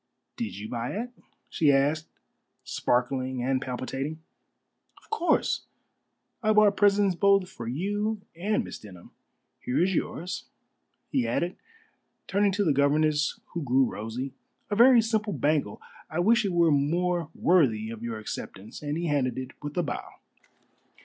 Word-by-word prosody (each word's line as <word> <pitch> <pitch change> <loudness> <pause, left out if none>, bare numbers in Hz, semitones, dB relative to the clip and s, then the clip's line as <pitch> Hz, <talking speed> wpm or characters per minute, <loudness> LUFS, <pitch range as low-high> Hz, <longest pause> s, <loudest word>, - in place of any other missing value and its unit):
"Did 235 - -4
you 105 +1 -6
buy 120 +1 -3
it?" 235 +4 -4 0.4
she 150 -3 +3
asked, 145 +3 +2 0.6
sparkling 130 0 0
and 130 0 +1
palpitating. 135 +4 -4 0.8
"Of - - -23
course. 355 -6 +1 0.7
I 215 -2 +3
bought 210 -1 +5
presents 200 -1 +4
both 195 +1 +3
for 120 -10 -8
you 205 - -1 0.2
and 205 +5 0
Miss - - -8
Denham. 95 -5 -13 0.5
Here 125 - -1
is 190 +1 +1
yours," 180 +1 -3 0.7
he 260 -3 +1
added, 175 +2 -1 0.7
turning 200 +1 +2
to 205 +1 +1
the 155 - +3
governess, 150 +1 +2
who 170 - -2
grew 135 -1 +3
rosy, 120 +5 -5 0.4
"a - - +1
very 240 +1 +7
simple 215 -2 0
bangle. 145 -7 0 0.3
I 160 - -5
wish 225 +6 +4
it 195 - 0
were 170 -2 +4
more 170 +3 +1
worthy 115 -11 +3
of 115 -1 -8
your 115 -1 -4
acceptance," 110 0 -7
and 150 +1 -2
he 170 - -2
handed 140 -5 0
it 130 0 -5
with 145 +2 -6
a 175 - +2
bow. 150 - -5
155 Hz, 150 wpm, -27 LUFS, 130-200 Hz, 0.8 s, very